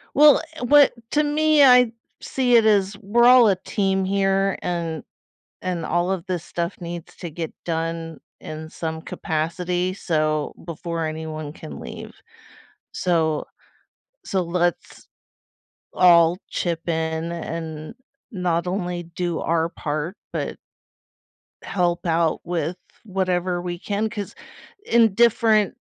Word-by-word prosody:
Well, 295 0 +7 0.2
what 285 +3 +6 0.2
to 300 0 +3
me, 305 0 +4
I 250 -3 +7 0.3
see 250 -2 +1
it 225 - +6
as 200 -2 +3
we're 230 +3 +3
all 245 -2 +8
a 195 - +4
team 190 0 -1
here, 195 0 +1
and 170 -3 -3 0.6
and 175 -3 -3
all 175 +2 0
of 185 -3 -3
this 180 -3 -2
stuff 170 +2 -4
needs 170 -1 -7
to 170 - -6
get 165 0 -5
done 165 -1 -3 0.2
in 155 0 -8
some 160 -1 -5
capacity 175 +3 -2
so 155 -5 -1
before 170 0 -4
anyone 155 -1 -5
can 75 - -10
leave. - - -8 0.8
So, 160 -4 0 0.8
so 190 -1 0
let's 175 0 -2 0.9
all 170 -1 +5
chip 170 -1 -3
in 160 0 -1
and 160 0 -6 0.4
not 175 -3 -1
only 180 -1 -3
do 170 0 -3
our 165 0 0
part, 155 +2 -4 0.2
but - - -3 1.1
help 175 -2 -1
out 165 -1 +1
with 170 0 -2 0.3
whatever 180 -2 -1
we 175 -1 -4
can, 210 +2 -2
'cause 205 -3 -6 0.5
in 230 -3 +4
different 220 -2 +3
175 Hz, 125 wpm, -23 LUFS, 165-195 Hz, 1.1 s, all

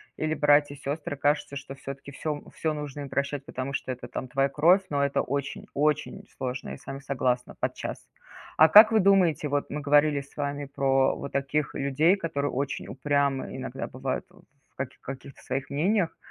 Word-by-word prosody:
или 155 0 -1
братья, 145 -1 +4
сёстры. 145 +1 -4
Кажется, 145 0 0
что 135 0 -8
всё-таки 140 +1 -8
всё 145 +1 -4
всё 160 -1 -1
нужно 150 -1 -6
им 140 - -6
прощать, 140 0 -2
потому 130 +1 -5
что 130 - -3
это, 125 - -7
там, 130 - -5
твоя 135 +1 +2
кровь, 175 +8 +5
но 140 -1 +1
это 140 - +1
очень 140 +1 -3
очень 150 +7 0
сложно, 130 -1 -4
я - - -6
с - - -20
вами 135 0 -5
согласна, 130 -2 -1
подчас. - - -3 0.6
А 160 - +8
как 215 +5 +10
вы 220 - +4
думаете, 185 -6 +3
вот 145 0 -1
мы 150 +1 -4
говорили 145 0 +4
с 140 - -18
вами 145 0 -2
про 135 -1 +2
вот 140 - -7
таких 140 +1 -1
людей, 145 +6 +3
которые 160 -6 -2
очень 140 +2 -3
упрямы 140 -1 0
иногда 130 0 -5
бывают 130 +5 -3
в 175 -6 -25
каких 135 -1 -6
каких-то 135 0 -9
своих 135 +1 -3
мнениях 180 +5 +1
140 Hz, 185 wpm, -27 LUFS, 135-150 Hz, 0.6 s, как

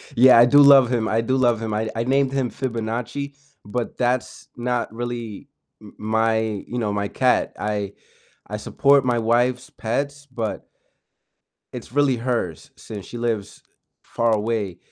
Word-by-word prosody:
Yeah, 125 0 +7
I 120 - +8
do 145 +4 +5
love 140 -3 +7
him, 115 -3 0
I 115 +1 +1
do 130 +3 0
love 120 -3 +2
him, 110 -1 -3
I 110 +1 -1
I 115 - -1
named 135 +1 +1
him 135 -3 0
Fibonacci, 125 +3 -4 0.3
but 115 +3 -4
that's 125 0 -2
not 120 -2 -2
really 120 -3 -6 0.3
m - - -14
my 110 +1 +1 0.3
you 125 - -4
know, 105 -3 -1
my 100 0 -1
cat, 130 +3 +1
I 105 -1 -2 0.5
I 105 - -4
support 140 +4 +3
my 120 -2 +1
wife's 120 +2 +1
pets, 140 +5 -3
but 115 -5 -5 1.1
it's - - -8
really 140 -2 +2
hers 120 0 -3
since 105 -3 -9
she 120 - -8
lives 115 -4 -3 0.4
far 115 -1 0
away, 105 -4 -1
120 Hz, 155 wpm, -22 LUFS, 110-130 Hz, 1.1 s, I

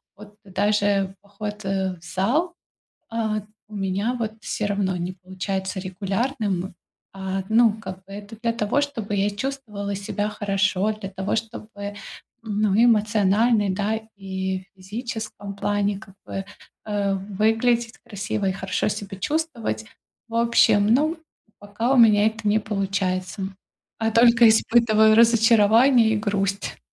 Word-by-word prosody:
вот, 205 0 -14
даже 200 0 +1
поход, 205 +1 -7
э, 190 -1 -1
в 165 - -22
зал, 245 - 0 0.6
а, 220 -2 -1 0.3
у 215 - -12
меня, 200 +4 -1
вот, 220 -2 -2
всё 210 - -3
равно 195 -2 0
не 175 +1 -3
получается 190 +1 -4
регулярным. 195 0 -2 0.4
А, 190 0 -3
ну, 225 0 +5
как 190 -3 -9
бы, 195 - -14
это 205 +2 -9
для 230 -1 0
того, 230 +4 0
чтобы 230 -8 -3
я 200 +1 +1
чувствовала 210 -3 -4
себя 205 +1 -2
хорошо, 205 0 0
для 210 -3 -7
того, 190 0 -3
чтобы, 215 -2 -6 0.5
ну, 210 -2 0
эмоционально, 215 0 +3
да, 210 +3 -1 0.2
и 190 -1 -3
в - - -49
физическом 215 0 -6
плане, 205 0 0
как 195 -2 -15
бы, 195 - -5 0.4
э, 205 -2 0
выглядеть 225 +4 0
красиво 205 -2 -3
и - - +1
хорошо 190 0 -2
себя 200 -2 -5
чувствовать. 235 - -2 0.4
В 230 - -10
общем, 230 -3 +4
ну, 310 +5 +2 0.4
пока 205 +5 -2
у 270 - +3
меня 215 -3 +6
это 220 0 -2
не 215 +1 +3
получается, 195 -3 -2 0.6
а 225 0 0
только 235 0 +6
испытываю 220 -1 +4
разочарование 230 +1 +5
и - - 0
грусть. 200 -1 -2
205 Hz, 135 wpm, -23 LUFS, 195-225 Hz, 0.6 s, меня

